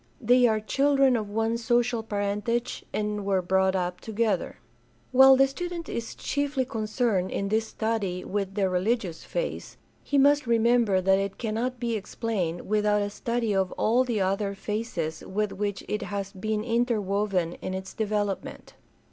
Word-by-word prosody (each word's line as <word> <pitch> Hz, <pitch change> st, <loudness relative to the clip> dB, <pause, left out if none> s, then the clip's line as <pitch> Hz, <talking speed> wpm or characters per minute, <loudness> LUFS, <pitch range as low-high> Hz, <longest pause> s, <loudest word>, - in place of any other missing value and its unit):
They 245 Hz, +2 st, +5 dB
are 220 Hz, -1 st, +2 dB
children 275 Hz, +3 st, +3 dB
of 215 Hz, -3 st, -2 dB
one 225 Hz, +2 st, 0 dB
social 240 Hz, 0 st, +1 dB
parentage 210 Hz, +3 st, -2 dB
and 210 Hz, -1 st, -2 dB
were 195 Hz, -2 st, +1 dB
brought 190 Hz, +1 st, +2 dB
up 180 Hz, -1 st, -2 dB
together. 220 Hz, 0 st, -1 dB, 0.5 s
While 265 Hz, +1 st, +8 dB
the 270 Hz, +1 st, +5 dB
student 340 Hz, +4 st, -5 dB
is 230 Hz, -1 st, -5 dB
chiefly 285 Hz, -2 st, -1 dB
concerned 215 Hz, -5 st, -1 dB
in 195 Hz, -, -2 dB
this 220 Hz, +1 st, +1 dB
study 210 Hz, -6 st, -2 dB
with 195 Hz, -1 st, -3 dB
the 200 Hz, -2 st, +2 dB
religious 185 Hz, -1 st, -1 dB
phase, -, -, -4 dB, 0.2 s
he 285 Hz, -, -1 dB
must 285 Hz, -1 st, +4 dB
remember 230 Hz, -4 st, +3 dB
that 190 Hz, +1 st, +3 dB
it 195 Hz, 0 st, -3 dB
cannot 235 Hz, +3 st, -2 dB
be 235 Hz, -2 st, -1 dB
explained 195 Hz, -5 st, -3 dB
without 210 Hz, 0 st, +1 dB
a 205 Hz, -, -3 dB
study 235 Hz, 0 st, -1 dB
of 190 Hz, -2 st, +1 dB
all 240 Hz, +4 st, +2 dB
the 235 Hz, -5 st, -1 dB
other 195 Hz, +1 st, 0 dB
phases 195 Hz, -7 st, -3 dB
with 210 Hz, +1 st, -2 dB
which 205 Hz, -1 st, -3 dB
it 210 Hz, -, -2 dB
has 200 Hz, -1 st, -4 dB
been 215 Hz, +2 st, -2 dB
interwoven 205 Hz, -6 st, 0 dB
in 185 Hz, -, -3 dB
its 190 Hz, 0 st, -6 dB
development. 205 Hz, -2 st, -3 dB
215 Hz, 155 wpm, -27 LUFS, 195-235 Hz, 0.5 s, While